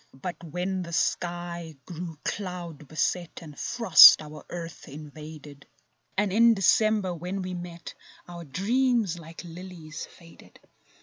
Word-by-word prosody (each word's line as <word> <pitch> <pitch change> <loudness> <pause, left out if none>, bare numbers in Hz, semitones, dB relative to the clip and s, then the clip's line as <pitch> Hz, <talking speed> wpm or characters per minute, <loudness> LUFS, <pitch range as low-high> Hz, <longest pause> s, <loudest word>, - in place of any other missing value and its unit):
But 175 +3 -6
when 180 +4 -3
the 170 -1 -7
sky 175 -1 -2
grew 170 -2 -7
cloud 175 -7 -5
beset, 170 +3 -2
And 150 -3 -11
frost 230 -8 +8
our 150 -1 -10
earth 170 -1 -7
invaded, 150 0 -11 0.5
And 205 -2 +1
in 230 +1 +6
December 205 0 +3
when 180 +3 -4
we 185 0 -5
met— 175 -1 -8 0.3
Our 175 -1 -8
dreams, 215 - 0
like 165 +1 -10
lilies, 170 -3 -9
faded. 170 -1 -18
175 Hz, 125 wpm, -27 LUFS, 160-185 Hz, 0.5 s, frost